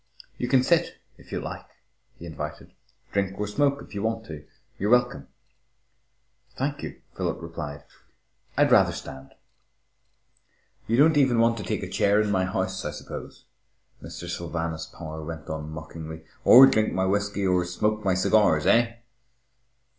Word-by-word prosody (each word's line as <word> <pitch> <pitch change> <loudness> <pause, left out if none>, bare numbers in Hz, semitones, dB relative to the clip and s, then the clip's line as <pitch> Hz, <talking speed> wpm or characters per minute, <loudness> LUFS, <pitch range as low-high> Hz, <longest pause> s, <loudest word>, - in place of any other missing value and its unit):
"You 125 - -1
can 130 0 +4
sit, 170 +4 +1 0.2
if - - -17
you - - -2
like," - - -7 0.5
he 85 - -10
invited. 80 -2 -7 0.4
"Drink 100 -1 -1
or 105 - 0
smoke 140 +6 0
if - - -15
you 100 - -4
want 110 +1 -2
to. 75 -2 -9 0.3
You're 100 - 0
welcome." 125 - +2 1.3
"Thank 140 +2 -2
you," - - -8
Philip - - -2
replied. 75 -3 -7 0.7
"I'd - - +4
rather - - +5
stand." 65 0 -9 1.5
"You 115 - +1
don't 150 +4 +7
want 155 - 0
even 120 -4 +4
to 105 - -6
take - - -1
a - - -4
chair 100 +1 +2
in 105 -1 +1
my 95 -2 +2
house, 95 - -2
I - - -2
suppose," - - -9 0.6
Mr. - - -8
Sylvanus 85 -1 -4
Power 80 -1 -8
went 80 +1 -7
on 80 -1 -5
mockingly, 80 0 -8 0.2
"or 130 +2 +10
drink 110 -5 +2
my 95 - +1
whisky 100 +1 0
or 90 -1 +2
smoke 105 +5 -1
my 95 -2 +2
cigars, 95 -5 +3
eh?" 115 0 +3
100 Hz, 155 wpm, -26 LUFS, 80-115 Hz, 1.5 s, or